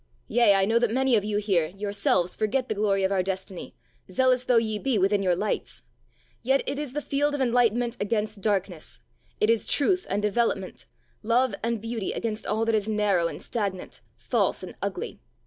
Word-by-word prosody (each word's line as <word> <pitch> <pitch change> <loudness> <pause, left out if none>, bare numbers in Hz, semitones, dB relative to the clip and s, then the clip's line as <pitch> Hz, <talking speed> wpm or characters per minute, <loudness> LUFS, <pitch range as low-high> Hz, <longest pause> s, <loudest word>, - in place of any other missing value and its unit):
Yea, 230 -3 +5
I 195 0 +3
know 225 +3 +3
that 240 -1 +2
many 260 +2 +2
of 210 - +2
you 210 0 -1
here, 195 -6 +1
yourselves 195 -1 0
forget 245 +4 0
the - - +1
glory 200 -2 +1
of 190 - +1
our 195 -1 +2
destiny, 190 0 -5 0.3
zealous 255 +5 +2
though 250 -2 +3
ye 220 -2 0
be 260 -2 0
within 195 +1 +2
your 180 -2 +2
lights. 205 +4 -3 0.6
Yet 265 +3 +2
it 275 +1 -2
is 295 -4 -5
the 295 0 -3
fight 290 +1 0
of - - -4
enlightenment 240 -1 +2
against 210 0 -2
darkness. 190 -6 -2 0.4
It 215 - +4
is 230 -3 +1
truth 365 +5 +1
and 200 - 0
development, 210 +3 -1 0.3
love 240 +4 +2
and 230 0 -1
beauty 225 -2 -3
against 220 -1 -4
all 220 +2 0
that 225 - +1
is 215 -1 0
narrow 205 -5 +2
and - - -8
stagnant, 200 -6 -4 0.2
false - - 0
and - - -7
ugly. - - -4
215 Hz, 190 wpm, -26 LUFS, 200-240 Hz, 0.6 s, Yea